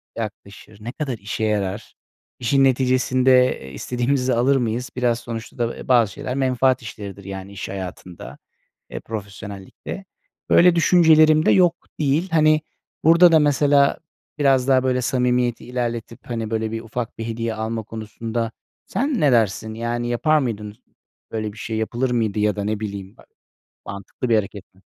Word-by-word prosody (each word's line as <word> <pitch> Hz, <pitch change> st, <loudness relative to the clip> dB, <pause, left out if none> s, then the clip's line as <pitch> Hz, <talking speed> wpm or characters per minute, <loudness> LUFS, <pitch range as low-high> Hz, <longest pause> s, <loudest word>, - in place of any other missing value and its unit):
yaklaşır, 105 Hz, -1 st, -8 dB
ne 120 Hz, -, -5 dB
kadar 135 Hz, -3 st, -4 dB
işe 105 Hz, +2 st, -4 dB
yarar, 105 Hz, -1 st, -2 dB, 0.4 s
işin 135 Hz, +3 st, +2 dB
neticesinde, 130 Hz, 0 st, +3 dB
eee, 65 Hz, -, -10 dB
istediğimizi 125 Hz, -, -1 dB
alır 125 Hz, +4 st, +3 dB
mıyız? 120 Hz, 0 st, -1 dB
Biraz 120 Hz, -2 st, +1 dB
sonuçta 115 Hz, -2 st, -7 dB
da, 120 Hz, -1 st, -2 dB
eee, -, -, -10 dB
bazı 120 Hz, -5 st, +4 dB
şeyler 125 Hz, -, -5 dB
menfaat 130 Hz, -1 st, +2 dB
işleridir 100 Hz, -3 st, -8 dB
yani 95 Hz, 0 st, -7 dB
iş 100 Hz, -1 st, -6 dB
hayatında, 90 Hz, -2 st, -8 dB, 0.5 s
eee, -, -, -6 dB
profesyonellikte. 100 Hz, -, -8 dB, 0.4 s
Böyle 175 Hz, 0 st, +6 dB
düşüncelerim 155 Hz, -1 st, +5 dB
de -, -, +5 dB
yok 175 Hz, -2 st, +4 dB, 0.2 s
değil. 150 Hz, +5 st, +1 dB
Hani, 155 Hz, -1 st, +4 dB, 0.4 s
burada 170 Hz, +2 st, +7 dB
da 160 Hz, -, +6 dB
mesela 145 Hz, -1 st, +3 dB, 0.4 s
biraz 135 Hz, -3 st, +3 dB
daha, 130 Hz, -1 st, +4 dB
böyle, 130 Hz, -1 st, +1 dB
samimiyeti 125 Hz, -1 st, 0 dB
ilerletip, 120 Hz, -2 st, -4 dB
hani, 115 Hz, -2 st, -3 dB
böyle, 110 Hz, 0 st, -2 dB
bir 115 Hz, 0 st, -4 dB
ufak 115 Hz, +1 st, -5 dB
bir 115 Hz, -, -4 dB
hediye 115 Hz, 0 st, -3 dB
alma 110 Hz, +1 st, -3 dB
konusunda 115 Hz, +1 st, -4 dB, 0.3 s
sen 275 Hz, -2 st, -1 dB
ne 145 Hz, -3 st, +4 dB
dersin? 110 Hz, -2 st, +1 dB
Yani, 120 Hz, +1 st, -3 dB
yapar 155 Hz, +6 st, +2 dB
mıydın 105 Hz, -6 st, -4 dB, 0.6 s
böyle 110 Hz, -2 st, -3 dB
bir -, -, -16 dB
şey, 110 Hz, +1 st, -4 dB
yapılır 120 Hz, +3 st, -1 dB
mıydı 110 Hz, -4 st, 0 dB
ya 105 Hz, -1 st, +2 dB
da 100 Hz, -, -3 dB
ne 105 Hz, +1 st, -2 dB
bileyim 100 Hz, -2 st, -6 dB
ba -, -, -17 dB, 0.6 s
mantıklı 100 Hz, +5 st, -6 dB
bir 115 Hz, -, +3 dB
hareket 100 Hz, -2 st, -4 dB
mi? 95 Hz, -, -25 dB
120 Hz, 160 wpm, -22 LUFS, 110-130 Hz, 0.6 s, burada